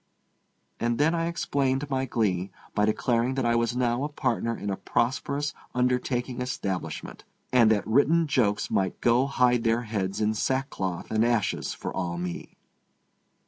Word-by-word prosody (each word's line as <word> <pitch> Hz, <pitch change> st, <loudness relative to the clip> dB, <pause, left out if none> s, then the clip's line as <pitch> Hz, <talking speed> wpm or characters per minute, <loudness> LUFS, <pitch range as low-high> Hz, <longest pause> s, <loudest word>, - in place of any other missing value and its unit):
And 120 Hz, 0 st, 0 dB
then 155 Hz, +3 st, +3 dB
I 165 Hz, 0 st, 0 dB
explained 140 Hz, -4 st, 0 dB
my 130 Hz, 0 st, 0 dB
glee 100 Hz, -7 st, 0 dB, 0.2 s
by 105 Hz, -, +2 dB
declaring 120 Hz, +3 st, +1 dB
that 135 Hz, -2 st, 0 dB
I 120 Hz, -, +3 dB
was 115 Hz, 0 st, +1 dB
now 125 Hz, +1 st, +1 dB
a 150 Hz, -, -2 dB
partner 120 Hz, -5 st, -1 dB
in 100 Hz, -, -3 dB
a -, -, -1 dB
prosperous 130 Hz, +8 st, -1 dB, 0.2 s
undertaking 125 Hz, 0 st, 0 dB
establishment, 100 Hz, -8 st, -4 dB, 0.3 s
and 120 Hz, -3 st, +6 dB
that 105 Hz, -2 st, +2 dB
written 145 Hz, +9 st, +3 dB
jokes 105 Hz, -8 st, +1 dB
might 95 Hz, -1 st, 0 dB
go 120 Hz, +3 st, +3 dB
hide 125 Hz, -3 st, +2 dB
their 115 Hz, +1 st, +2 dB
heads 100 Hz, -4 st, -2 dB
in 110 Hz, 0 st, +2 dB
sackcloth 110 Hz, -7 st, -2 dB
and 110 Hz, 0 st, +3 dB
ashes 115 Hz, -4 st, 0 dB
for -, -, -6 dB
all 85 Hz, -2 st, -2 dB
me. 90 Hz, 0 st, -6 dB
120 Hz, 155 wpm, -27 LUFS, 105-130 Hz, 0.3 s, and